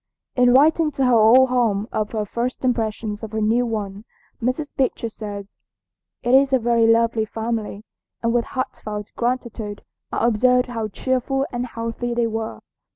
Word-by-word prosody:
In 250 -1 +5
writing 310 +4 +4
to 270 -1 +1
her 250 - +3
old 235 +4 +6
home 225 -5 +1
of 210 -1 -1
her 215 -1 -1
first 240 +5 -3
impressions 220 -3 -1
of 220 -1 -7
her 220 - -1
new 230 +3 +2
one, 205 -2 -4 0.4
Mrs. 255 +5 -2
Beecher 260 -4 0
says: 205 -2 -8 0.7
"It 245 - +1
is 270 +1 +5
a 265 - +5
very 235 -1 +2
lovely 230 0 +3
family, 220 -1 -4 0.4
and 230 0 +1
with 240 -1 +1
heartfelt 210 -5 -5
gratitude 235 -4 -3 0.3
I - - 0
observed 250 +2 +3
how 225 -3 -3
cheerful 260 +5 -1
and 245 0 -3
healthy 230 +1 -4
they 235 -1 +2
were. 225 0 -4
230 Hz, 160 wpm, -22 LUFS, 220-250 Hz, 0.7 s, old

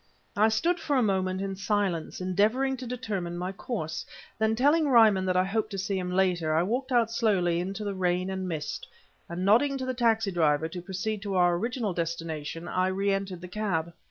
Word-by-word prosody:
I 215 +2 +4
stood 335 +11 +1
for 290 - -1
a 255 - +3
moment 190 -2 0
in 195 0 -3
silence, 195 -4 -1
endeavoring 215 +9 +1
to 255 0 -7
determine 205 -8 -4
my 180 +2 -3
course; 185 -6 -4 0.4
then, 220 0 +2
telling 295 +6 +3
Ryman 220 -7 +5
that 180 0 +2
I 185 - +4
hoped 215 +3 -1
to 200 - -5
see 195 +1 -2
him 180 -1 -3
later, 180 -4 +1
I 165 - +3
walked 250 +7 -2
out 235 -2 +3
slowly 190 -7 +1
into 195 +4 -4
the 200 -1 -2
rain 185 0 0
and 190 -1 -3
mist, 155 -4 -4 0.4
and 175 +2 -3
nodding 270 +7 +4
to 260 - -4
the 255 - -1
taxi 225 -4 +2
driver 160 -3 +2
to 175 +2 -7
proceed 195 +3 -3
to 200 -1 -3
our 175 -1 +4
original 230 +1 -2
destination, 165 -1 -4
I 185 +1 +1
re 195 +2 0
entered 195 -3 -3
the 180 - -7
cab. 175 -4 -2
195 Hz, 205 wpm, -28 LUFS, 180-220 Hz, 0.4 s, Ryman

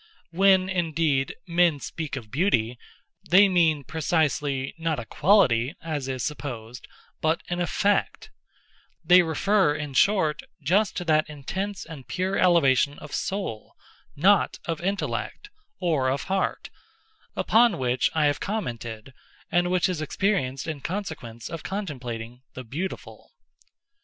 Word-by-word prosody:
When, 190 +1 +4
indeed, 165 -6 0
men 170 -3 +3
speak 155 0 -5
of 115 -6 -8
Beauty, 125 - +1 0.5
they 195 +3 +7
mean, 165 -6 +2
precisely, 145 -3 -1
not 160 -3 -1
a 120 - -6
quality, 145 - +3
as 150 -5 -4
is 130 -3 -3
supposed, 120 -4 -6 0.3
but 160 +1 +1
an 175 0 -2
effect—they 200 - 0
refer, 175 0 +2
in 150 -2 -5
short, 160 -2 +2 0.2
just 190 +8 +2
to 180 - -3
that 155 -1 +2
intense 190 +8 -5
and 150 -6 -10
pure 190 +1 -1
elevation 145 -6 +3
of 150 - -11
soul—not 190 - -1
of 165 -1 -3
intellect, 200 - -3 0.3
or 155 -7 +1
of 135 +2 -1
heart—upon 225 - -1
which 125 -2 +1
I 155 -2 +3
have 145 0 +1
commented, 120 - -5 0.4
and 175 0 +2
which 180 -1 +2
is 180 -4 -3
experienced 155 -6 -1
in 155 -3 -4
consequence 155 - -5
of 165 - -6
contemplating 125 - -5
"the 130 - -6
beautiful." 160 +11 -7
160 Hz, 120 wpm, -25 LUFS, 135-185 Hz, 0.5 s, they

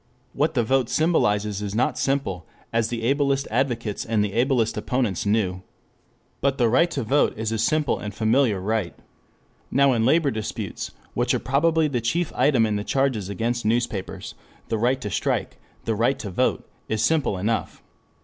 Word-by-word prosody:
What 150 +2 0
the 120 - +3
vote 130 +1 +1
symbolizes 105 - +1
is 100 0 -4
not 120 - +1
simple, 115 - -1 0.3
as 115 -1 +2
the 115 -1 -4
ablest 140 +2 +1
advocates 120 -4 -1
and 110 -2 +1
the 100 - -5
ablest 120 -2 +1
opponents 115 -8 -1
knew. 100 -4 +1 0.8
But 140 0 +1
the 120 - +3
right 165 +9 +4
to 140 -6 -3
vote 135 +3 +2
is 110 0 -2
a 110 - -1
simple 150 +5 +1
and 105 - -5
familiar 110 +1 +2
right. 105 -1 -2 0.7
Now 140 -1 +4
in 115 -2 +1
labor 145 +3 +3
disputes, 110 -2 -4 0.2
which - - +1
are - - 0
probably 160 +4 +2
the 125 -5 -1
chief 160 +8 -1
item 130 -6 +3
in 105 -1 0
the 105 - -3
charges 130 -6 0
against 115 +4 -2
newspapers, 110 -3 -2 0.4
the 110 - 0
right 125 +4 +2
to 105 - -4
strike, - - -1
like - - -33
the 115 - 0
right 115 +5 +1
to 100 - -6
vote, - - 0 0.2
is 110 0 0
simple 150 -8 +1
enough. 110 +5 -2
115 Hz, 180 wpm, -24 LUFS, 105-135 Hz, 0.8 s, right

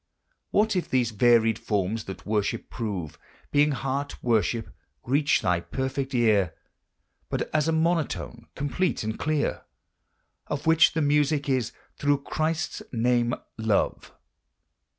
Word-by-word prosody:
What 215 0 +2
if 180 - -1
these 125 -3 +1
varied 115 0 +4
forms 105 +1 -1
that 95 - -8
worship 105 -1 -1
prove, 95 -10 -4 0.3
Being 145 +1 +4
heart 135 +2 -3
worship, 115 -1 +1 0.3
reach 140 +4 +2
thy 90 -1 +2
perfect 130 +9 -3
ear 105 -8 +3 0.7
But - - -3
as 155 0 +2
a - - +3
monotone, 160 -1 -1
complete 145 +4 -1
and 110 0 -4
clear, 155 -1 0 0.9
Of 145 0 -4
which 160 0 +5
the 160 -1 +1
music 145 0 +2
is, 130 -4 0 0.3
through 145 -1 +1
Christ's 160 +2 -2
name, 120 0 +2 0.2
love? 110 -2 0
130 Hz, 125 wpm, -26 LUFS, 110-150 Hz, 0.9 s, which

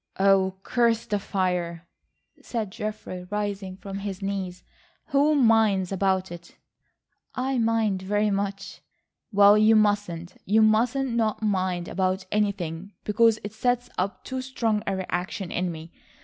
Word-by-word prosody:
"Oh, 190 -1 +4
curse 235 -2 +1
the 205 -1 -1
fire," 180 -4 -2 0.6
said 220 -5 -4
Geoffrey 210 -4 -6
rising 200 -2 -3
from 195 0 -7
his 195 -2 -5
knees. 190 -2 -4 0.5
"Who 290 +2 +3
minds 220 -7 +3
about 190 -1 0
it?" 170 0 -11 0.8
"I 260 0 -1
mind 225 -4 +1
very 205 +2 +1
much." 195 0 -3 0.5
"Well, 205 0 +6
you 220 +1 +6
mustn't. 205 -5 0
You 220 +3 +3
must 220 +4 +3
not 235 -5 0
mind 185 -4 0
about 185 0 -1
anything, 200 -3 -2
because 225 +1 +3
it 205 0 -6
sets 245 +2 0
up 185 +1 -2
too 260 -1 -4
strong 230 -5 -1
a 195 - 0
reaction 185 0 -3
in 180 0 -1
me. 160 0 -9
200 Hz, 135 wpm, -25 LUFS, 185-220 Hz, 0.8 s, Well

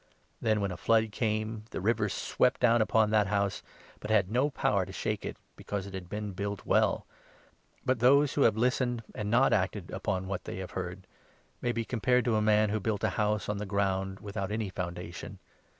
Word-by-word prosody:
Then, 110 -2 +2
when 100 -1 -1
a 90 - -5
flood 110 +2 +2
came, 110 -1 -2
the - - -4
river 105 +1 +1
swept 125 - +1
down 120 -1 +4
upon 110 -1 +3
that 105 -2 +3
house, 100 -1 0 0.4
but 105 - -7
had 100 -3 +3
no 130 +5 +2
power - - +1
to - - -8
shake - - -2
it, - - -5 0.2
because 100 -2 -4
it 100 - -9
had 90 -2 -7
been 105 0 -4
built 100 +1 -4
well. - - +2 0.8
But 130 -2 +1
those 140 +4 +5
who 145 - 0
have 115 - +5
49 110 - -2
listened 125 -1 +1
and 105 -1 -3
not 125 +4 +4
acted 95 -1 -1
upon 95 -2 -2
what 95 -1 -4
they - - -5
have 95 -1 -6
heard - - -5 0.6
may 120 - +1
be 115 -1 -2
compared 125 +1 +1
to 120 -3 +2
a 110 - +2
man 105 0 +3
who 110 - 0
built 105 0 -2
a - - +3
house 105 0 0
on 105 -1 -2
the 105 - -3
ground 95 -1 -1
without 100 -1 -4
any 110 -2 -2
foundation. 90 -1 -6
105 Hz, 210 wpm, -30 LUFS, 100-115 Hz, 0.8 s, those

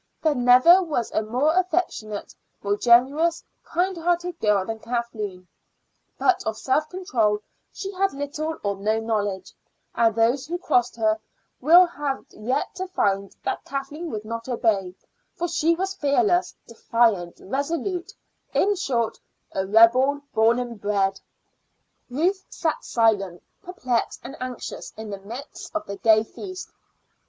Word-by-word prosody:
There 310 -2 +3
never 255 +8 +6
was 300 -10 -2
a - - +1
more 250 +8 +1
affectionate, 345 - -1 0.3
more 200 0 +1
generous 270 +9 +3 0.2
hearted 350 -1 -1
girl 210 -3 +2
than 225 +1 -5
Kathleen; 220 -6 -4 0.7
but 375 - +2
of 220 0 -3
self 300 +4 0
control 240 - 0 0.3
she 390 - -6
had 390 +1 +1
little 300 +3 -4
or 200 -1 -1
no 215 +3 0
knowledge, 210 -4 -2 0.4
and 225 -2 +2
those 240 +5 +2
who 345 +2 -2
crossed 245 -9 +1
her 220 -1 +1 0.4
will 340 +7 +7
had 290 -5 -4
yet 225 +5 -2
to 375 0 -3
find 200 - -1
that - - -2
Kathleen 285 +5 -5
would 215 -5 -5
not 230 +2 -5
obey, 205 -7 0 0.4
for 350 -2 -2
she 335 0 +2
was 380 +2 -2
fearless, 355 +5 +1
defiant, 225 -8 +1
resolute 335 - -3 0.4
in 410 - +3
short, 250 - -1 0.3
a 190 0 -2
rebel 250 +7 +5
born 225 +2 +4
and 240 -4 -5
bred. 195 -1 0 0.9
Ruth 360 +9 0
sat 320 -3 -2
silent, 200 -6 +1 0.2
perplexed, 255 -10 -2
and 270 +4 -8
anxious 255 -1 -6
in 220 -1 -7
the 200 - -5
midst 240 +11 -9
of 320 - -2
the 200 0 -6
gay 220 0 +4
feast. 370 - -9
250 Hz, 140 wpm, -24 LUFS, 215-330 Hz, 0.9 s, will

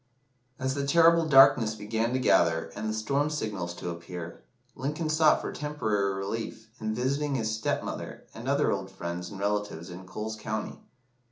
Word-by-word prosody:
As 130 0 -1
the 140 0 -2
terrible 165 +2 +5
darkness 130 -6 +6
began 110 +2 -1
to - - +2
gather, 85 -5 +3
and 110 +1 -3
the - - -1
storm 140 +7 0
signals 105 -12 -3
to 90 - -4
appear, 85 0 -8 0.3
Lincoln 150 +4 -3
sought 155 0 +4
for - - -4
temporary 110 -10 -1
relief 110 +3 -5
in 110 0 -1
visiting 140 +4 0
his 110 -3 -1
stepmother 110 - -3
and 115 +3 -8
other 140 +1 +3
old 95 -1 -2
friends 90 -2 -5
and 100 - -9
relatives 100 -4 -2
in 95 +1 -9
Coles 110 +3 -4
County. 110 0 -4
110 Hz, 165 wpm, -28 LUFS, 95-140 Hz, 0.3 s, darkness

